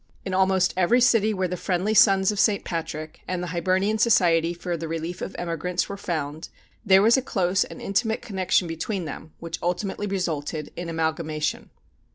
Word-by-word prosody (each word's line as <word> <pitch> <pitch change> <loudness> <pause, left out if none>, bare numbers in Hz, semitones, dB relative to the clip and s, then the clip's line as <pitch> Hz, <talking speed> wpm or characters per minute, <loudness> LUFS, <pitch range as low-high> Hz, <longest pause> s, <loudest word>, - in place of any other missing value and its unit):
In 190 - -3
almost 190 0 +2
every 185 +7 +3
city 230 -3 +4
where 190 -3 -1
the 180 - -3
Friendly 185 +4 -1
Sons 195 -3 +5
of 205 - -4
St. 205 -1 +2
Patrick 155 -2 -5
and 180 -1 -2
the 180 - -4
Hibernian 190 +5 +1
Society 170 -7 +4
for 175 0 -4
the 165 0 -5
Relief 165 +2 -4
of - - -5
Emigrants 175 +1 -2
were 200 - -5
found, 155 -5 -4 0.3
there 195 -2 +5
was 230 +4 +5
a - - +1
close 185 -6 +1
and - - -10
intimate 220 +4 -1
connection 190 -5 0
between 170 +3 -3
them, 155 0 -8
which 165 -1 -6
ultimately 190 +3 -2
resulted 160 -6 -3
in 175 0 -5
amalgamation. 160 -1 -2
180 Hz, 180 wpm, -25 LUFS, 165-195 Hz, 0.3 s, Sons